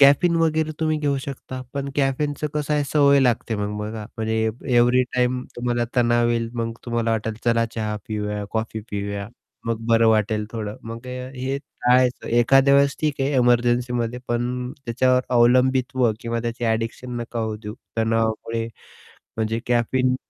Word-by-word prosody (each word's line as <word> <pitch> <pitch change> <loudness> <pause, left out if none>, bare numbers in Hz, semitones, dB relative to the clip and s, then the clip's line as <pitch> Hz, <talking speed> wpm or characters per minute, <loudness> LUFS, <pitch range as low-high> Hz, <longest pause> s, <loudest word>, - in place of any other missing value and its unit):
Caffeine 145 +5 +6
वगैरे 160 -1 +1
तुम्ही 155 -1 +1
घेऊ 145 -2 0
शकता. 130 -1 -7
पण 140 0 -2
कॅफीनचं 145 +2 0
कसं 150 0 -1
आहे 145 - +2
सवय 140 -1 +4
लागते 120 -3 +1
मग. 105 0 -3
बघा 105 0 -5
म्हणजे 110 0 -1 0.4
एव्हरी 125 +1 +5
टाईम 125 0 +1
तुम्हाला 120 0 0
तणाव 120 -1 +3
येईल 115 -1 0
मग 115 -1 -2
तुम्हाला 115 -1 -1
वाटेल 110 0 -1
चला 115 -1 +3
चहा 105 -1 -2
पिऊया, 105 -1 -3
कॉफी 110 0 -2
पिऊया, 100 0 -3 0.4
मग 115 -1 0
बरं 115 0 +5
वाटेल 110 -1 +2
थोडं. 105 -2 -5
मग 115 +2 -7
हे 130 +1 -4
टाळायचं 125 -2 +1
एखाद्या 135 +4 +5
वेळेस 140 0 +4
ठीक 150 -3 -1
आहे. 135 - +1
एमर्जन्सीमध्ये, 120 -1 +2
पण 125 +1 -1
त्याच्यावर 125 +2 +2 0.2
अवलंबित्व 125 0 +3
किंवा 115 0 -2
त्याची 120 +1 -3
ॲडिक्शन 115 +2 -2
नका 120 0 -5
होऊ 110 -1 -2
देऊ 105 +1 -6 0.2
तणावामुळे 115 0 0 0.7
म्हणजे 110 +1 0
कॅफीन 125 +2 +2
120 Hz, 150 wpm, -23 LUFS, 115-130 Hz, 0.7 s, कॅफीन